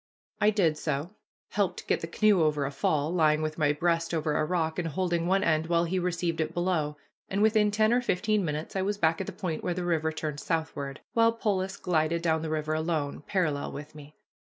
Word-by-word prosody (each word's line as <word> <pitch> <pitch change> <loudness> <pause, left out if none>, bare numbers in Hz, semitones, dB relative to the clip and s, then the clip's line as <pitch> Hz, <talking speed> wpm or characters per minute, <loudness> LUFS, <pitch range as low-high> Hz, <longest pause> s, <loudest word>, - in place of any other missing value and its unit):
I 210 - +5
did 170 -8 +2
so 150 +3 -2 0.4
helped 200 -4 -1
get - - 0
the 165 - -4
canoe 205 +1 +3
over 150 -2 +2
a 140 - -3
fall, 145 +3 0
lying 155 -3 +3
with 155 +1 -3
my 145 -1 +3
breast 165 +2 0
over 155 -1 0
a - - +2
rock, 160 0 -1
and 170 - -1
holding 170 +1 -1
one 195 +1 +2
end 160 0 +1
while 170 0 +2
he 180 +2 -1
received 175 -2 -1
it 160 +1 -3
below 170 -4 0 0.3
and 200 +2 +1
within 215 -1 +4
ten 215 +2 +3
or 245 - +3
fifteen 215 -1 +1
minutes 155 +1 -4
I 190 - +1
was 200 +2 -1
back 165 -1 +2
at 190 - -5
the - - -3
point 185 -4 -4
where 175 - -1
the 180 0 -3
river 160 -2 +1
turned 155 -2 -4
southward, 155 -5 -3
while 230 0 +5
Polis 195 -4 -1
glided 170 -1 0
down 160 -2 +2
the 160 - -3
river 155 0 -1
alone, 155 -3 -1
parallel 155 -7 -1
with 150 +2 -8
me. 150 0 -13
165 Hz, 220 wpm, -28 LUFS, 155-185 Hz, 0.4 s, I